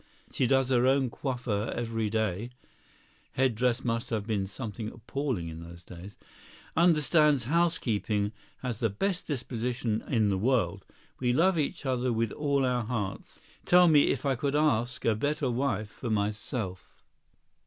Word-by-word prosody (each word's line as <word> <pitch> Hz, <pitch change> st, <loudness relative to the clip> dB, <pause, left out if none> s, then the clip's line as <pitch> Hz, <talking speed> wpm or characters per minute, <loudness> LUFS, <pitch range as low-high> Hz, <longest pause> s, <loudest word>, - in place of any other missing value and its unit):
She 130 Hz, -, +1 dB
does 135 Hz, 0 st, +3 dB
her 125 Hz, -1 st, +3 dB
own 135 Hz, -2 st, +2 dB
coiffure 120 Hz, -6 st, -2 dB
every 115 Hz, -2 st, -2 dB
day 110 Hz, 0 st, -1 dB, 0.8 s
[head 130 Hz, -2 st, +2 dB
dress 125 Hz, +2 st, 0 dB
must 115 Hz, -1 st, -1 dB
have 110 Hz, -3 st, -2 dB
been 105 Hz, -3 st, -1 dB
something 105 Hz, 0 st, -6 dB
appalling 120 Hz, -, -3 dB
in 80 Hz, 0 st, -7 dB
those 85 Hz, +1 st, -11 dB
days]; 90 Hz, +4 st, -11 dB, 0.6 s
understands 150 Hz, -4 st, +4 dB
housekeeping; 115 Hz, -, 0 dB, 0.3 s
has 120 Hz, -4 st, -3 dB
the 115 Hz, -, +1 dB
best 185 Hz, -, -1 dB
disposition 120 Hz, -4 st, -2 dB
in 110 Hz, -5 st, +2 dB
the 95 Hz, -1 st, 0 dB
world. 110 Hz, -4 st, 0 dB, 0.3 s
We 125 Hz, -1 st, +1 dB
love 170 Hz, +5 st, +3 dB
each 145 Hz, -1 st, -2 dB
other 130 Hz, -1 st, 0 dB
with 115 Hz, -2 st, 0 dB
all 140 Hz, -2 st, 0 dB
our 125 Hz, -2 st, 0 dB
hearts. 110 Hz, -4 st, -4 dB, 0.2 s
Tell 180 Hz, 0 st, +6 dB
me 150 Hz, -3 st, +5 dB
if 135 Hz, -, -1 dB
I 135 Hz, -, +3 dB
could 140 Hz, +3 st, -1 dB
ask 125 Hz, -5 st, +1 dB
a 115 Hz, -, +4 dB
better 145 Hz, +4 st, -1 dB
wife 115 Hz, -5 st, -1 dB
for 120 Hz, -, -6 dB
myself?" 105 Hz, -2 st, -3 dB
120 Hz, 155 wpm, -29 LUFS, 105-135 Hz, 0.8 s, Tell